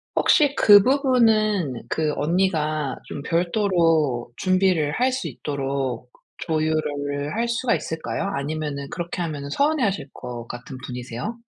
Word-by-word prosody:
혹시 290 -2 +4
그 205 -1 +8
부분은 220 - +2
그 155 -2 0
언니가 155 -4 0
좀 145 - -6
별도로 165 - +1
준비를 185 -5 +2
할 255 +1 +3
수 260 +1 -3
있도록 135 -4 -3 0.3
조율을 150 -2 -1
할 235 +2 0
수가 235 +1 +1
있을까요? 160 +4 -4
아니면은 145 -1 -3
그렇게 175 0 -4
하면은 145 -4 -4
서운해하실 250 - 0
것 120 -1 -7
같은 125 +2 -8
분이세요? 125 - -5
155 Hz, 280 characters per minute, -23 LUFS, 140-205 Hz, 0.3 s, 그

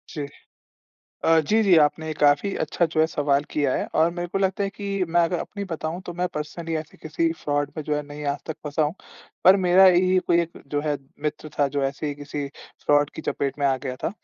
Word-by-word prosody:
जी। 145 - -3 1.0
अ, 165 0 +5
जी, 215 +9 +2
जी। 190 -4 +5
आपने 155 +1 0
काफ़ी 145 +7 +3
अच्छा 165 +3 +1
जो 155 - +2
है 160 - +5
सवाल 145 -2 +1
किया 145 -3 +1
है, - - -1
और 160 +2 +4
मेरे 175 0 -4
को 195 - -2
लगता 195 +1 0
है 195 - -2
कि 200 -1 -5 0.2
मैं 175 +1 +3
अगर 175 +1 -1
अपनी 200 +3 -5
बताऊँ, 160 +2 -3
तो 175 - -4
मैं 180 - +2
पर्सनली 160 +2 -4
ऐसे 155 -1 -7
किसी 165 +1 0
फ्रॉड 145 -1 0
में 155 - -3
जो 150 - 0
है 150 - -2
नहीं 145 0 -8
आज 145 - -6
तक 160 - -4
फँसा 150 +2 0
हूँ। 150 +2 0 0.5
पर 185 +2 +8
मेरा 185 +2 +7
यही 185 +1 +5
कोई 170 0 +4
एक 170 0 -5
जो 145 - +1
है 145 -1 +1 0.3
मित्र 150 +1 -4
था 145 - +4
जो 140 - +1
ऐसे 140 +3 -3
ही 145 - -2
किसी 145 0 -5 0.4
फ्रॉड 145 0 +3
की 160 - -7
चपेट 140 +1 -3
में 140 - +2
आ 135 -1 +2
गया 130 0 -3
था। - - 0
155 Hz, 235 wpm, -24 LUFS, 145-175 Hz, 1.0 s, पर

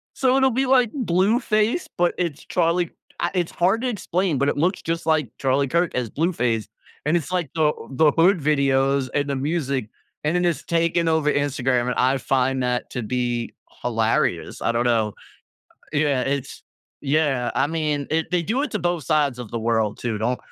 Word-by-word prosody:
So 260 -1 +2
it'll 265 0 +4
be, 260 +3 +1
like, 255 -3 +3
Blueface, 215 - +1
but 175 0 +2
it's 165 -4 -3
Charlie 170 -1 +1 0.3
uh, - - +1
it's 175 -3 -1
hard 190 +7 +1
to 255 - -1
explain, 185 - -1
but 140 - +1
it - - +1
looks 175 +6 0
just 165 +1 -3
like 155 -6 +1
Charlie 135 +1 +1
Kirk 170 +4 +1
as 125 -3 -2
Blueface, 125 - 0 0.4
and 155 +3 +3
it's, 165 +1 -5
like, 175 -6 -1
the 155 -2 +3 0.2
the 150 +3 +4
hood 175 +4 +4
videos 140 -2 +2
and 145 0 0
the 140 - 0
music, 140 -5 -2 0.3
and 150 +3 0
then 180 0 +2
it's 170 -3 0
taken 170 0 +1
over 160 -2 +2
Instagram, 130 -3 0
and 125 - -1
I 130 +2 +2
find 130 0 0
that 125 0 -1
to 125 - -3
be 120 0 -2 0.3
hilarious, - - 0
I - - +1
don't 120 +1 0
know. 110 -3 +1 0.8
Y 145 - +1
yeah, 145 -4 +2
it's 140 +1 -3 0.4
yeah, 140 -4 +1
I 135 - +2
mean, 150 -3 -1
it 160 +2 0
they 180 -1 +1
do 225 - -1
it 295 - -2
to 215 - 0
both 175 -4 -1
sides 145 -5 +1
of 120 -3 -7
the 115 - -3
world, 110 -2 0
too. 115 -3 -2
Don't 120 +3 -1
150 Hz, 195 wpm, -23 LUFS, 130-175 Hz, 0.8 s, it'll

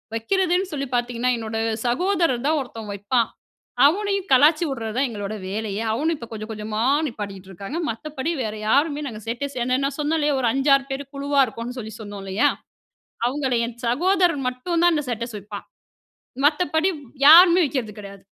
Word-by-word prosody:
வைக்கிறதுன்னு 365 - 0
சொல்லி 275 -2 -3
பார்த்தீங்கன்னா, 240 +1 0
என்னோட 225 0 -4 0.3
சகோதரர் 330 -3 +1
தான் 310 -1 +2
ஒருத்தன் 225 -4 -8
வைப்பான். 210 +4 0 0.6
அவனையும் 395 +4 +1
கலாய்ச்சி 300 +6 +5
வுடுறது 225 -4 -4
தான் 270 0 +2
எங்களோட 205 -1 -5 0.2
வேலையே. 210 0 -3
அவனும் 315 +8 0
இப்ப 235 - -9
கொஞ்சம் 215 0 -7
கொஞ்சமா 215 0 -4 0.3
நிப்பாட்டிட்ருக்காங்க. 200 - -7
மத்தபடி 290 +6 -4
வேற 215 -1 -3 0.2
யாருமே 290 +3 +2
நாங்க 215 -4 -7
ஸ்டேட்டஸ் 255 +4 -4
ஏன்னா 255 +1 +1
நான் 275 - -2
சொன்னேன் 300 +2 +1
இல்லையா, 295 -2 +1
ஒரு 240 - +1
5,6 275 0 +3
பேர் 270 +1 -3
குழுவா 280 0 0
இருக்கோம்னு 230 +2 -7
சொல்லி 220 -2 -7
சொன்னோம் 205 -2 -8
இல்லையா! 195 +3 +1 0.8
அவங்கள்ல 260 -2 0
என் 235 - -8
சகோதரர் 350 +4 +2
மட்டும் 290 +8 -3
தான் 350 0 +5
அந்த 300 -2 0
ஸ்டேட்டஸ் 235 -1 -4
வைப்பான். 205 0 -9 0.8
மத்தபடி 315 +2 +2
வ் 290 - -13 0.2
யாருமே 345 +3 +9
வைக்கிறது 260 -7 -2
கிடையாது. 200 -1 -11
255 Hz, 160 wpm, -23 LUFS, 220-305 Hz, 0.8 s, யாருமே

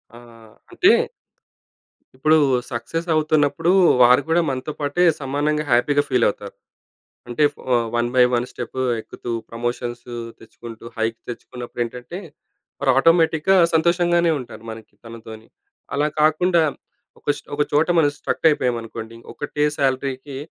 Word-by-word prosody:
ఆహ్, 115 -2 -16 0.2
అంటే - - +4 1.2
ఇప్పుడూ 155 +4 +3 0.3
సక్ససవుతున్నప్పుడూ, 155 +4 0 0.3
వారు 125 +2 +6
కూడా 170 +2 +3
మనతో 135 +3 -4
పాటే 145 +4 0 0.2
సమానంగా 145 +3 -1
హ్యాపీగా 145 +4 +3
ఫీలవుతారు. 105 -5 0 0.7
అంటే, 120 +5 0
ఫ్ - - -42 0.4
వన్ 120 0 +1
బై 125 - +6
వన్ 120 0 +1
స్టెపు 130 - -5 0.2
ఎక్కుతూ, 120 +2 -8 0.2
ప్రమోషన్స్ 120 +1 -4 0.3
తెచ్చుకుంటూ, 115 0 -12
హైక్ 115 0 -1
తెచ్చుకున్నప్పుడేంటంటే, 120 +5 -6 0.6
మరి 140 - +1
ఆటోమేటిక్‌గా 165 +4 +4 0.2
సంతోషంగానే 170 +1 +3
ఉంటారు, 115 -3 -10
మనకి 110 0 -12
మనతోని. 110 -1 -11 0.5
అలా 145 +1 +1
కాకుండా, 170 +3 +3 0.6
ఒక - - -37
ష్ - - -12
ఒక 145 - -1
చోట 150 +2 +3
మనం 145 -3 +4
స్ట్రక్కయిపోయామనుకోండి, 115 -6 -1 0.2
ఒకటే 150 +1 -2
శాలరీకి 135 0 -2
130 Hz, 110 wpm, -21 LUFS, 120-155 Hz, 1.2 s, వారు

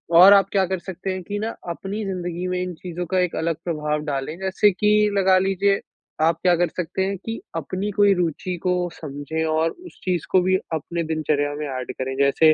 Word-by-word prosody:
और 185 +4 +10
आप 195 -1 +5
क्या 195 -2 +3
कर 190 0 -2
सकते 190 +1 -6
हैं 185 - -4
कि 205 +3 -4
ना 220 +2 -2 0.2
अपनी 195 +5 -4
ज़िंदगी 180 -2 -3
में 180 0 -1
इन 180 -1 -3
चीज़ों 175 +1 -5
का 185 - +3
एक 180 -2 0
अलग 165 0 0
प्रभाव 150 -3 -1
डालें 145 +2 -3
जैसे 190 +2 +3
कि 210 +2 +3
लगा 190 -1 +5
लीजिये 195 +1 +2 0.4
आप 165 +1 +3
क्या 180 -1 +4
कर 175 +1 +2
सकते 180 +3 -3
हैं, 195 +1 -1
कि 225 +5 -5 0.2
अपनी 185 +6 -3
कोई 205 0 +4
रूचि 180 0 -1
को 180 0 +2 0.2
समझें 150 +1 -4
और 160 +1 +2
उस 355 0 -14
चीज़ 180 -3 -1
को 185 - +5
भी 185 +1 +2 0.2
अपने 170 +2 -2
दिनचर्या 155 -2 0
में 150 +1 -4
एड 130 -2 -4
करें। 130 0 -2
जैसे, 140 +3 +5
180 Hz, 210 wpm, -23 LUFS, 160-190 Hz, 0.4 s, और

